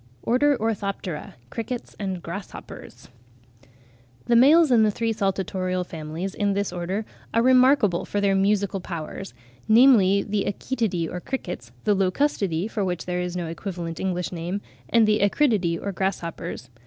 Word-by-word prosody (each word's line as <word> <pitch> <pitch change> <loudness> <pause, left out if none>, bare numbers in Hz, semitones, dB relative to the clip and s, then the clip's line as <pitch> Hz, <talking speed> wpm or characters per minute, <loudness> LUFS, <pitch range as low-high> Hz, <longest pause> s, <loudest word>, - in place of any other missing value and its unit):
ORDER, 280 +4 +3
ORTHOPTERA 200 -7 -3 0.2
(CRICKETS 235 +2 -5
AND 190 -4 -3
GRASSHOPPERS). 190 +4 -9 1.2
The 235 - +3
males 295 +5 +6
in 235 -2 +6
the 215 - +4
three 225 +2 -1
saltatorial 185 -2 -1
families 165 +3 -5
in 205 -1 0
this 200 -2 -1
Order 185 +5 -3 0.3
are 230 - +4
remarkable 255 -7 +4
for 205 - -2
their 200 -1 +2
musical 195 0 +1
powers, 175 +2 -7 0.3
namely 220 -5 +6
the 205 -1 -1
Achetidae 205 -6 -1
or 180 - -5
crickets, 175 - -5
the 210 - +3
Locustidae 195 - 0
for 215 -2 -2
which 180 -2 -2
there 180 0 -2
is 180 0 -3
no 175 - -2
equivalent 170 0 -5
English 180 -2 -2
name, 175 +3 -3 0.3
and 230 -2 +4
the 215 0 +3
Acridiidae 200 - +2
or 200 - -3
grasshoppers. 170 -9 -4
195 Hz, 145 wpm, -24 LUFS, 180-220 Hz, 1.2 s, males